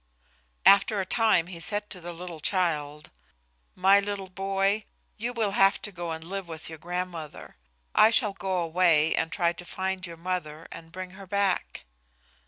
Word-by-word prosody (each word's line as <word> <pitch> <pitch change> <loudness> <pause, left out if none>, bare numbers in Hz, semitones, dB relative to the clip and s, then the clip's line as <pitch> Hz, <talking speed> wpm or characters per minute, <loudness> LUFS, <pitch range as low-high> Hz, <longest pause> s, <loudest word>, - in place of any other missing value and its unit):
After 200 +1 +6
a 190 - -1
time 220 -5 +3
he 175 -1 -8
said 205 +4 -1
to 180 - -4
the 175 +1 -6
little 170 -1 -8
child, 150 -4 -1 0.6
"My 195 +2 +5
little 200 -1 -4
boy, 195 +2 0 0.3
you 235 +3 -3
will 225 -4 -1
have 195 0 +4
to 205 - -4
go 175 -2 -5
and 160 0 -5
live 190 +2 -5
with 160 -1 -7
your 160 -1 -9
grandmother. 175 -2 -5 0.4
I 220 - +7
shall 225 -3 +3
go 190 -1 -2
away 165 -2 +3
and 160 - -1
try 170 -2 +1
to 175 - -10
find 190 +1 -3
your 170 -1 -9
mother 165 -3 -4
and 165 0 -10
bring 185 0 -7
her 190 +1 -12
back." 200 - -1
185 Hz, 175 wpm, -27 LUFS, 165-195 Hz, 0.6 s, I